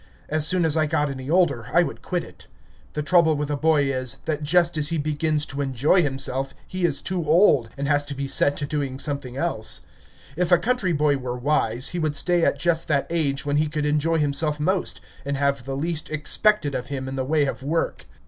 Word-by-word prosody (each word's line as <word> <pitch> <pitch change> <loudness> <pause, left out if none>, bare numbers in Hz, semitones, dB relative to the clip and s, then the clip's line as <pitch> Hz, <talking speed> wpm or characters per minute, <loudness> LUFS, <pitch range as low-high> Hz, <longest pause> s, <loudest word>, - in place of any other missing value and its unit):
As 155 0 0
soon 180 -2 +2
as 160 -1 +2
I 155 -1 +2
got 145 -1 0
any 130 0 -7
older, 155 -10 +2
I 175 - +5
would - - -6
quit 180 -2 -2
it. - - -15 0.5
The 150 - -2
trouble 165 -1 +4
with 150 0 -3
a - - 0
boy 155 0 +3
is, 130 -2 -2
that 155 -1 -2
just 170 +3 +2
as 150 -1 0
he 165 - -1
begins 150 0 0
to 145 0 -4
enjoy 140 +7 +2
himself 135 -2 -2
he 185 -1 -1
is - - 0
too 185 -2 -2
old, 155 - +4
and 140 0 -2
has 145 0 +3
to 140 - -5
be 140 0 -3
set 145 +1 +2
to 145 - -2
doing 140 -3 -3
something 135 -3 -4
else. 140 -9 -1 0.5
If 180 +2 0
a 175 - +8
country 215 0 0
boy 150 -2 +2
were 125 -1 -4
wise, 125 -2 0
he 175 - -4
would 155 -2 -1
stay 175 +3 +2
at 140 - +2
just 165 +2 0
that 140 -3 +1
age 145 -5 -1
when 145 0 0
he 155 +1 +2
could 150 0 -2
enjoy 150 +2 +1
himself 150 0 +1
most, 185 +5 -1 0.2
and 140 0 -2
have 140 -2 0
the 135 0 -4
least 160 +1 -3
expected 155 +2 +1
of 125 -1 -3
him 135 -2 -4
in 135 - -5
the 130 - -1
way 150 +2 +2
of 135 - -4
work. 160 +5 -2
150 Hz, 225 wpm, -23 LUFS, 140-165 Hz, 0.5 s, a